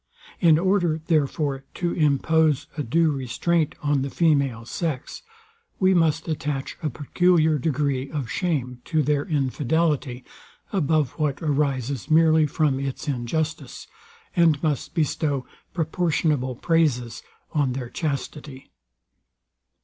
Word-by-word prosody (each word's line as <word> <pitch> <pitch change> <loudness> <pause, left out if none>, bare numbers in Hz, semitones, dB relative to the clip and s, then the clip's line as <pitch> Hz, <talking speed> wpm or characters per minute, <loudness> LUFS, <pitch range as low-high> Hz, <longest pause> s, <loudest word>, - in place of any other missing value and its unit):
In 165 -4 +5
order, 175 -3 +1
therefore, 145 -3 0
to 175 -1 -1
impose 155 0 +2
a 150 - -2
due 160 +5 +2
restraint 145 +5 0
on 145 -2 +1
the 140 - -2
female 140 -8 +1
sex, 150 0 -4 0.6
we 190 0 +4
must 160 -3 +2
attach 145 -3 -3
a 155 - -1
peculiar 160 +2 +2
degree 140 -2 -1
of 145 -6 -4
shame 130 -9 -2
to 155 -1 +1
their 145 0 +1
infidelity, 145 -2 0 0.5
above 155 -7 +1
what 145 -3 0
arises 140 -3 -1
merely 160 -1 +5
from 145 -2 +1
its 135 +2 -4
injustice, 145 +5 -3 0.5
and 165 -4 +3
must 150 0 -1
bestow 145 -4 0 0.3
proportionable 155 -6 0
praises 140 -6 0 0.3
on 140 -4 +1
their 125 -2 -5
chastity. 145 -2 -5
150 Hz, 115 wpm, -24 LUFS, 135-160 Hz, 0.6 s, In